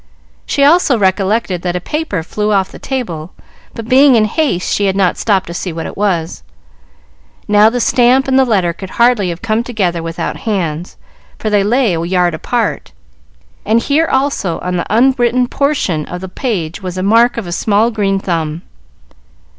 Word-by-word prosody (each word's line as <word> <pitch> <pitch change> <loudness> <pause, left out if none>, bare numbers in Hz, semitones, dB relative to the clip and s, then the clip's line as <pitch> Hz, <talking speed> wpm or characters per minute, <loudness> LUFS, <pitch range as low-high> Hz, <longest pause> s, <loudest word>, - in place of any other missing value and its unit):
She 280 - +1
also 295 -3 +4
recollected 195 -1 0
that 175 0 -2
a - - 0
paper 300 - -3
flew 210 +5 -2
off 195 -2 +1
the - - -11
table, 185 - -5 0.4
but 230 -1 -7
being 265 +1 +5
in 220 -2 +4
haste 225 - -1
she 205 - +1
had 190 - 0
not 190 -2 +2
stopped 195 -4 0
to 170 - -7
see 180 +1 -4
what 165 0 -5
it - - -7
was. 175 - -1 1.1
Now, 210 +1 +5
the 245 +2 -2
stamp 250 +3 +3
and 265 0 +3
the - - +5
letter 195 -8 +1
could 190 +2 -9
hardly 235 -5 +3
have 170 +3 -6
come 220 0 0
together 190 -8 -2
without 165 +1 -4
hands, 175 -6 -3 0.4
for 215 - -3
they 205 -1 +3
lay 235 -1 +2
a 165 - -2
yard 175 0 +1
apart, 155 - -2 0.7
and 220 +2 +2
here, 295 +7 +1
also, 265 -10 -1
on 180 0 -3
the 175 - -4
unwritten 245 +1 +2
portion 245 - -1
of 180 0 -6
the 190 - -6
page, 185 - -3
was 185 -1 -5
the 185 - -3
mark 230 +4 +3
of 230 - -3
a 175 - -6
small 215 +5 +1
green 200 -3 0
thumb. 165 -4 -3
205 Hz, 185 wpm, -15 LUFS, 180-240 Hz, 1.1 s, being